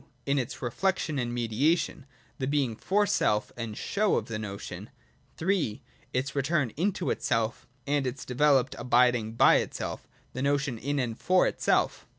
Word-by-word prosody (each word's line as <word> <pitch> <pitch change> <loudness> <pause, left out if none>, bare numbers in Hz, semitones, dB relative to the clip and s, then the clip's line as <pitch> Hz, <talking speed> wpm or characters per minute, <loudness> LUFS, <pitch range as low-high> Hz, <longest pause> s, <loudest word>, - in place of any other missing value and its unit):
In 140 0 +2
its 125 +1 -5
reflection 155 +3 0
and 120 -1 -2
mediation: 130 +6 0 0.3
the 130 - -1
being 140 -5 0
for 205 - +1
self 105 - +1
and 115 -3 -5
show 210 0 +1
of - - 0
the 110 -2 -4
notion. 100 -2 -7 0.5
III. 170 - +1
In 125 - -15 0.3
its 135 +3 -2
return 140 -3 +1
into 185 +2 0
itself, 115 -1 -1 0.2
and 140 -1 +1
its 130 +3 -5
developed 135 +1 +3
abid 125 +1 +4
ing 110 -2 -3
by 115 - +6
itself: - - -4 0.3
the 130 - -4
notion 140 -3 0
in 145 +4 -2
and 120 -4 -2
for 185 0 +3
itself. - - 0
130 Hz, 160 wpm, -28 LUFS, 120-150 Hz, 0.5 s, by